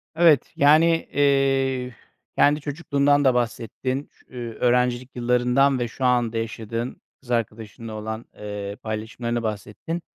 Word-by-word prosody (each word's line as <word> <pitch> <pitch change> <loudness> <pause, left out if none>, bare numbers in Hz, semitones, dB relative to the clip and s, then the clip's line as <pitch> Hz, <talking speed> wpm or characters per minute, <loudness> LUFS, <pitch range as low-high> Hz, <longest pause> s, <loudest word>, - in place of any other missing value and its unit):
Evet, 160 -5 +4
yani, 150 +3 +6 0.3
eee, 135 -3 +2 0.4
kendi 150 +1 +4
çocukluğundan 145 -1 +1
da 130 - +5
bahsettin. 125 +3 -2
Ş - - -26
eee, 120 -2 -5
öğrencilik 125 +1 +1
yıllarından 125 +2 +2
ve 120 - -1
şu 130 +3 -4
anda 120 -2 +2
yaşadığın 115 +1 -4 0.2
kız 125 -2 -10
arkadaşınla 115 0 -3
olan, 110 +2 -5
eee, 105 -1 -6
paylaşımlarından 115 +2 -3
bahsettin. 110 +10 -4
125 Hz, 125 wpm, -23 LUFS, 115-135 Hz, 0.4 s, yani